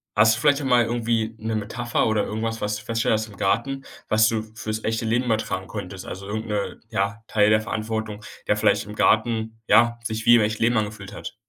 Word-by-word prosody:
hast 110 +1 +5
du 115 - -5
vielleicht 145 0 +4
auch - - -3
mal 125 -2 +4
irgendwie 115 -1 -1
'ne 110 0 -3
Metapher 110 +3 -1
oder 110 -2 +1
irgendwas, 115 +1 -3
was 105 0 -1
du - - -10
festgestellt 115 0 +1
hast 110 - -4
im 100 -3 -14
Garten, 135 +8 0 0.2
was 110 0 +4
du 110 -1 -1
fürs 110 0 -4
echte 115 +1 -1
Leben 120 +3 +1
übertragen 110 -5 -1
konntest? 95 -3 -7
Also 95 +1 -7
irgend 110 +2 -4
'ne 105 -2 -3
ja, 100 0 -2
Teil 105 -1 +3
der 110 0 +4
Verantwortung, 110 -1 -4 0.2
der 105 - +2
vielleicht 105 0 +2
im 105 - -8
Garten, 110 +1 +1
ja, 120 0 +5
sich 110 0 -3
wie 120 - +8
im 120 - +5
echten 110 +1 0
Leben 120 +1 +3
angefühlt 105 -2 -3
hat? - - -7
110 Hz, 220 wpm, -24 LUFS, 105-115 Hz, 0.2 s, wie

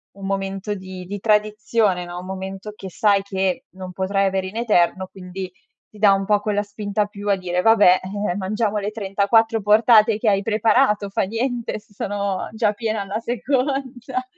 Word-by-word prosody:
un 195 -1 -9
momento 195 +1 -3
di 185 -1 -8
di 200 +3 -5
tradizione, 210 -2 +1
no, 175 0 -7
un 180 - -9
momento 190 +2 -6
che 190 -2 -8
sai 200 +2 +2
che 190 +4 -2
non 185 -1 -8
potrai 195 +2 0
avere 190 -1 -1
in 190 - -10
eterno, 190 -5 +2
quindi 185 0 -7 0.4
ti 215 - -17
dà 205 -1 +6
un 195 0 0
po' 205 +1 +3
quella 205 0 -1
spinta 205 0 -2
più 205 0 -9
a 200 - +4
dire: 180 -1 -2
"Vabbè, 205 -4 +6 0.3
eh, - - -3
mangiamo 210 +2 -1
le 205 0 -2
34 220 +2 +1
portate 215 +1 +5
che 220 - +2
hai 195 -1 +2
preparato 215 -1 +2
fa 195 - 0
niente, 235 +2 -2
se 205 - -25
sono 200 -1 -2
già 220 -1 +1
piena 220 -1 -2
alla 200 +2 -3
seconda". 255 +1 -2
205 Hz, 180 wpm, -21 LUFS, 190-220 Hz, 0.4 s, dà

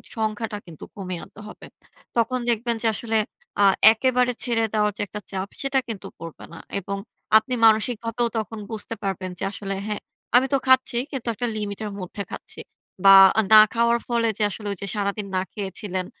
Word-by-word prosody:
সংখ্যাটা 220 -1 -2
কিন্তু 165 -3 -12
কমিয়ে 185 -4 -5
আনতে - - -15
হবে। - - -11 0.5
তখন 250 +2 +1
দেখবেন 235 0 0
যে 230 - +2
আসলে 225 +2 -2 0.5
আ - - +6 0.3
একেবারে 250 +2 +2
ছেড়ে 235 -2 +1
দেওয়ার 210 -1 +2
যে - - -3
একটা 210 +2 -7
চাপ, 190 0 -3
সেটা 275 -1 +1
কিন্তু 220 -5 -6
পড়বে 165 -1 -9
না। - - -9 0.2
এবং 200 +1 -5 0.4
আপনি 250 +4 -1
মানসিকভাবেও 230 +1 +2
তখন 220 0 -4
বুঝতে 220 +1 -4
পারবেন 190 -1 -3
যে - - -4
আসলে 195 -1 -4
"হ্যাঁ 210 -1 -3 0.4
আমি 255 +2 +5
তো - - +5
খাচ্ছি 260 -2 +4
কিন্তু 260 -4 -5
একটা 245 +3 -3
লিমিট 205 -2 -4
এর 210 - -5
মধ্যে 185 +3 -6
খাচ্ছি।" - - -7 0.5
বা 195 - +10 0.4
না - - +11 0.2
খাওয়ার 235 0 +2
ফলে 235 -1 +1
যে - - -4
আসলে 210 +1 -5
ঐ - - -1
যে 200 - -4
সারাদিন 200 0 -2
না - - +2
খেয়েছিলেন 190 -2 -4
215 Hz, 180 wpm, -23 LUFS, 200-235 Hz, 0.5 s, না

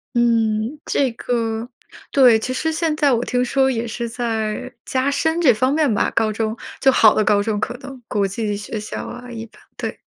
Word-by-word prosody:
嗯， 230 +2 +1
这 265 -4 +1
个 230 -1 -2 0.4
对， 250 -5 +6
其 255 - -3
实 320 +5 -1
现 315 -1 0
在 290 -3 +3
我 240 +1 +1
听 250 0 0
说 265 +1 +2
也 235 -2 -2
是 235 +1 -4
在 225 0 -3
加 260 +1 0
深 320 +4 0
这 270 -8 +5
方 255 +5 +1
面 300 -5 +2
吧， - - +1
高 220 -1 +2
中， 220 +1 -2 0.2
就 270 - +5
好 220 -4 +6
的 215 - +2
高 205 -1 +3
中 210 0 -1
可 - - -2
能， 265 -1 -10
国 200 -1 +1
际 205 +1 -2
学 210 +1 -5
校 210 - -6
啊 245 0 -9
一 230 -1 -6
般， - - -21
对。 - - -5
235 Hz, 220 characters per minute, -20 LUFS, 220-265 Hz, 0.4 s, 对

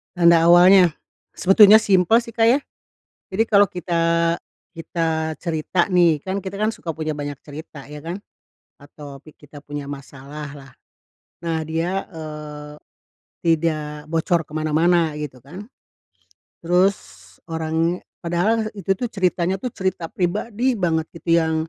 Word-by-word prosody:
Tanda 170 -2 +5
awalnya? 175 +1 +7 0.4
Sebetulnya 205 +3 +7
simpel, 200 +1 +3
sih, 235 -1 -10
Kak, 225 - +2
ya. 240 +5 +5 0.7
Jadi 220 +4 +1
kalau 205 -3 +4
kita 170 -1 0 0.4
kita 160 -1 -2
cerita, 170 +1 -1
nih, 175 -5 +3
kan, 190 +6 -4
kita, 190 +1 -6
kan, 215 +2 0
suka 165 - -6
punya 155 -1 -3
banyak 145 -1 -6
cerita, 150 -1 -10
ya, 150 +1 -10
kan, 170 +4 -5 0.6
atau 145 -1 -12
pi 155 +2 -17
kita 150 0 -14
punya 145 0 -7
masalah 140 +1 -9
lah. 135 -2 -13 0.7
Nah, 165 -1 -1
dia, 170 +4 -1
eee, 150 -3 -8 0.7
tidak 155 -2 -1
bocor 165 +1 +1
ke 155 - -17
mana-mana 160 +1 +2
gitu, 150 -3 -6
kan. 190 - -10 0.9
Terus 180 +3 +2 0.5
orangnya 165 +1 -1 0.2
padahal 190 +6 0
itu, 200 -1 -6
tuh, 245 - -1
ceritanya 185 -4 0
itu 250 - -2
cerita 185 -5 -3
pribadi 215 +7 -1
banget 165 -6 0
gitu 165 0 +1
yang 160 -1 0
165 Hz, 135 wpm, -21 LUFS, 155-190 Hz, 0.9 s, awalnya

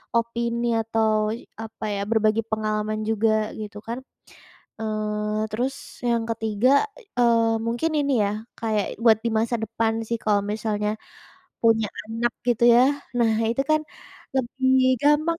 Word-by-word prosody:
opini 235 0 0
atau 220 -1 +1 0.3
apa 225 0 -8
ya, 200 - -2
berbagi 220 0 +2
pengalaman 215 -1 -2
juga 215 0 +2
gitu 210 -1 -7
kan, 235 - -3 0.8
eee, 215 0 -1
terus 255 +5 -1 0.3
yang 230 -1 +1
ketiga, 225 +1 +1 0.5
eee, 230 -1 +4
mungkin 240 +8 0
ini 280 -1 +1
ya 200 - 0 0.3
kayak 215 -3 -1
buat 220 -2 +6
di 230 - +2
masa 230 +2 +1
depan 225 0 0
sih 235 - -1
kalau 205 -2 +3
misalnya 210 -1 -1 0.7
punya 225 -1 +4 0.2
anak 230 +2 -1 0.2
gitu 235 -1 +3
ya. 245 - +7 0.4
Nah, 225 -2 +3 0.2
itu 255 +4 0
kan 310 0 +4 0.6
lebih 260 +1 0 0.3
gampang 310 +3 +3
225 Hz, 135 wpm, -24 LUFS, 215-235 Hz, 0.8 s, ya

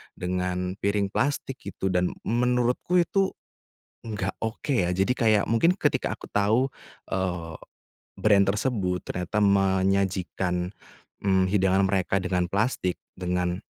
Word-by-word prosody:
dengan 90 +1 -2
piring 100 0 0
plastik 135 0 -1
gitu, 95 - -3
dan 90 0 +2 0.2
menurutku 125 +7 +1
itu 195 +2 +1 0.7
enggak 100 -4 -3
oke 115 +6 -4
ya. 90 -7 +2
Jadi 95 +6 +1
kayak 110 -3 +3
mungkin 165 +11 +4
ketika 195 - 0
aku - - -11
tahu, 110 +6 +2 0.4
eee, 90 -4 -2 0.6
brand 100 -2 +5
tersebut 100 -4 -1
ternyata 90 +4 -2
menyajikan, 95 -2 +1 0.5
mmm, 95 -2 +3
hidangan 95 0 +3
mereka 95 0 +1
dengan 90 -2 -1
plastik, 100 - 0 0.2
dengan 90 +1 -2
95 Hz, 120 wpm, -26 LUFS, 90-110 Hz, 0.7 s, brand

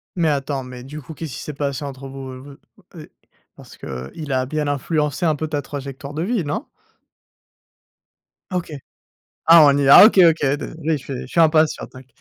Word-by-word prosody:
Mais 170 -2 +1
attends, 140 -2 -2
mais 125 -1 -10
du 150 +4 -9
coup, 155 +4 -11
qu'est-ce 155 -3 -7
qui - - -7
s'est 150 - -7
passé 140 -1 -3
entre 135 -1 -8
vous, 135 0 -8
heu, 130 - -8
vous, 140 +2 -12 0.5
ou, - - -8
heu? - - -12 0.5
Parce - - -15
que, 65 0 -8
il 150 -3 -7
a 130 -1 0
bien 150 +2 -3
influencé 145 +2 -1
un 155 -2 +2
peu 155 +2 -4
ta 150 -1 -2
trajectoire 140 0 -8
de 155 - -4
vie, 215 -1 -1
non? 150 - -4 1.8
OK. 180 -2 -3 0.8
Ah, 165 -1 +8
on 140 -1 +4
y 140 - +1
va. 140 +8 +9
OK 220 - +2
OK, 165 -3 +3
désolé 160 +1 -4
je 135 - -15
suis 135 -3 -6
je - - -9
suis 170 - 0
impatient, 155 -1 +3
t'inq 130 -1 -15
145 Hz, 205 wpm, -20 LUFS, 135-160 Hz, 1.8 s, va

